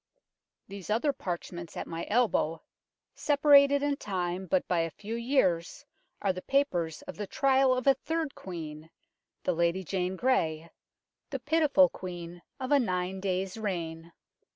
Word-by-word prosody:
These 195 -1 -9
other 240 +7 +2
parchments 175 -4 -6
at - - -3
my 165 0 -5
elbow, 205 -8 +1 0.5
separated 285 -1 +5
in 290 -1 +1
time 185 -3 -3
by 185 +1 +2
but 165 -2 +1
a - - -7
few 210 +8 -8
years, 235 -3 0 0.4
are 195 -2 +2
the 185 - -6
papers 180 - 0
of - - -9
the 205 -1 -4
trial 265 +1 +3
of 255 - -3
a 275 - +7
third 320 +2 -3
Queen 160 -3 -8 0.5
the 180 - +1
Lady 170 +3 +1
Jane 185 +1 -2
Grey, 165 -9 0 0.6
the 275 - -3
pitiful 290 0 +4
Queen 175 -4 -8 0.2
of 260 0 -4
a 285 - +6
nine 185 -4 -1
days' 190 +1 -2
reign. 170 -5 -4
190 Hz, 150 wpm, -29 LUFS, 175-265 Hz, 0.6 s, a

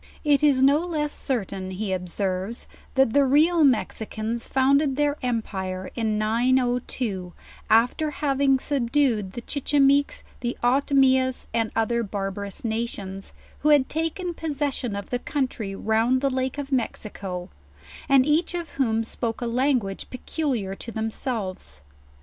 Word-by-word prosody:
It 290 -2 +3
is 280 -3 +4
no 280 +2 +5
less 310 -4 -2
certain, 195 -7 -3
he 190 +1 -3
ob 180 -1 -4
serves, 190 +4 -3 0.3
that 265 -4 +3
the 285 - +5
real 310 +5 +4
Mexicans 225 -3 0
founded 275 +1 +3
their 290 0 +1
empire 190 -7 -3
in 220 -3 -1
902, 235 -4 0 0.4
after 240 +8 +3
having 275 -2 +2
subdued 255 -7 0
the 240 - -5
Chichimeques, 285 0 +2 0.2
the 240 0 -3
Otomias, 260 0 +3
and 225 -1 +1
other 235 +1 +1
barbarous' 200 0 -4
nations, 210 -4 -4 0.3
who 300 - +2
had 290 -3 +5
taken 330 +3 -2
possession 285 -8 -2
of 200 -1 -6
the 245 - 0
country 250 -8 -3
round 225 +5 +1
the 275 -1 +1
lake 260 +1 -2
of 285 -1 -5
Mexico, 200 -7 -3 0.6
and 270 -2 +6
each 315 +4 +1
of 340 -3 -4
whom 225 -3 +2
spoke 225 0 -3
a 240 - -3
language 240 -5 0
peculiar 250 -7 -2
to 230 +4 -8
themselves. 215 - -4
245 Hz, 135 wpm, -25 LUFS, 215-280 Hz, 0.6 s, and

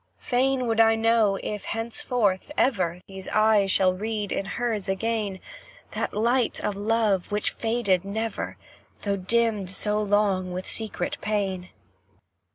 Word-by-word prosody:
Fain 260 0 +1
would 225 -1 0
I 225 0 +6
know 225 -3 +3
if, 210 -1 -4
henceforth, 225 -1 -1
ever, 180 -8 +1
These 190 -1 -9
eyes 215 -2 +3
shall 185 -1 +3
read 210 +1 -3
in 195 - -1
hers 215 -1 -2
again, 205 -1 -1 0.5
That - - -2
light 235 +3 +1
of 210 -1 -2
love 210 -2 +1
which 210 0 0
faded 225 -6 0
never, 220 +3 -3 0.5
Though 200 -1 0
dimmed 210 0 +1
so 210 +2 -1
long 200 -3 +1
with 185 +1 -5
secret 250 +6 -2
pain. 195 -4 -2
210 Hz, 135 wpm, -26 LUFS, 195-225 Hz, 0.5 s, I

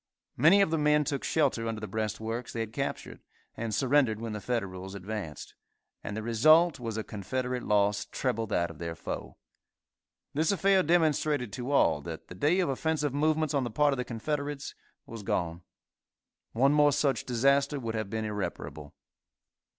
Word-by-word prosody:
Many 165 +10 +6
of 160 - -1
the 160 - +1
men 150 0 +4
took 140 -2 -3
shelter 135 -7 +1
under 115 -1 -3
the 110 - -5
breastworks 110 +3 -3
they 115 - -2
had 110 -1 -5
captured, 135 +2 -4 0.4
and 115 -1 -3
surrendered 130 -2 +2
when 115 -1 -4
the 105 - -5
Federals 95 -5 -3
advanced, 95 -6 -6 0.5
and 105 - -5
the 110 - -4
result 155 +8 +5
was 115 -2 -4
a 110 - -2
Confederate 125 +5 -3
loss 105 -1 +1
treble 115 -4 -2
that 85 -4 0
of - - -14
their 85 -1 -4
foe. - - -6 1.0
This 155 +4 +2
affair 195 -1 +3
demonstrated 150 - +1
to 125 +3 -4
all 105 - +3
that 80 +1 -8
the - - -7
day 150 - +2
of 175 - 0
offensive 150 +1 -1
movements 155 +1 +1
on 140 -2 +1
the 120 - -2
part 145 +6 +2
of - - -3
the 125 - -1
Confederates 140 +4 -4 0.3
was 115 -1 -8
gone. 85 -3 -2 0.9
One 135 +5 +4
more 150 -1 +5
such 140 -1 +1
disaster 140 +4 +2
would 115 -3 -4
have 110 -3 -3
been 110 +1 -2
irreparable. 95 -8 -5
125 Hz, 175 wpm, -29 LUFS, 110-145 Hz, 1.0 s, Many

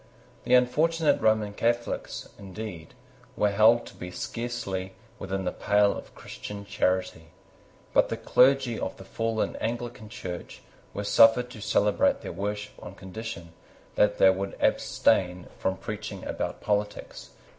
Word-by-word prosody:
The 125 - +5
unfortunate 155 +6 +3
Roman 110 -2 +2
Catholics, 120 +2 -2
indeed, 95 -4 -8 0.4
were 105 - +2
held 110 +3 +5
to - - -11
be 90 - -8
scarcely 95 -2 -4 0.3
within 95 0 -3
the - - 0
pale 105 0 +2
of - - -10
Christian 100 -1 -8
charity. 95 -4 -1 0.7
But - - +4
the - - -2
clergy 130 -3 +3
of - - -4
the - - -10
fallen 115 -1 -2
Anglican 120 -1 -4
Church 95 -6 -7 0.3
were 100 - -4
suffered 115 +4 +5
to 110 - -10
celebrate 110 - +2
their - - -6
worship 105 +1 -4
on 90 - -9
condition 95 -4 -8 0.4
that 105 0 +3
they 95 - +7
would 95 +1 -4
abstain 90 -1 +2
from 95 0 -1
preaching 105 -1 -6
about - - -4
politics. 105 0 -2
105 Hz, 135 wpm, -27 LUFS, 95-115 Hz, 0.7 s, they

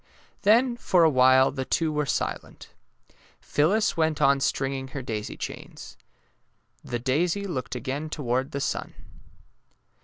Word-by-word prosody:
Then 235 +4 +4
for 180 -7 +3
awhile 130 -3 +5
the 130 -1 -4
two 160 +4 0
were 150 -1 -1
silent. - - -4 0.7
Phyl 150 +2 +1
lis 215 +2 +1
went 160 -2 0
on 140 0 +4
stringing 135 0 -1
her 135 0 -7
daisy 110 -3 -5
chains. - - -8 0.9
The 120 - -3
daisy 165 +11 0
looked 140 -9 -4
again 140 +5 -4
toward 130 -3 -2
the 140 - -4
sun. - - -3
140 Hz, 130 wpm, -26 LUFS, 130-165 Hz, 0.9 s, awhile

